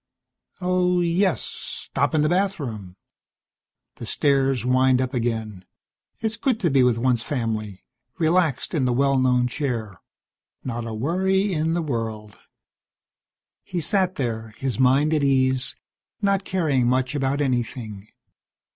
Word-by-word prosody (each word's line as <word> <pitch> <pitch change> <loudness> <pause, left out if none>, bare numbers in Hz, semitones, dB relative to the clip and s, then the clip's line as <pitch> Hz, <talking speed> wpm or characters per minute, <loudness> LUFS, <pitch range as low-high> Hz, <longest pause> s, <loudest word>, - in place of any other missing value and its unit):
Oh, 180 0 +2
yes, 175 +2 +1
stop 140 +3 -2
in 150 - +3
the 150 - +2
bathroom. 140 - -2 1.0
The - - -7
stairs 135 -3 +1
wind 130 0 +3
up 130 +1 -1
again. 110 -5 -2 0.5
It - - -25
is 220 +1 -1
good 240 -1 0
to 170 -6 +2
be 135 -1 +4
with 125 -2 +3
one's 120 -1 +1
family, 110 -7 -3 0.3
relaxed 165 -4 +1
in 145 -6 +1
the 125 - +1
well 135 +1 +2
known 125 -1 +3
chair. 120 - -3 0.6
Not 120 -2 -4
a 115 - -5
worry 190 - +1
in 160 +1 0
the 170 - 0
world. 110 -6 -4 1.2
He 180 - -4
sat 185 +2 +1
there, 110 -4 -4
his 130 -4 -2
mind 135 +4 +4
at 150 -2 +1
ease, 130 -1 +2 0.4
not 200 -1 +1
caring 150 -9 +1
much 130 +2 +1
about 140 0 0
anything. 120 -6 -2
135 Hz, 140 wpm, -23 LUFS, 120-165 Hz, 1.2 s, be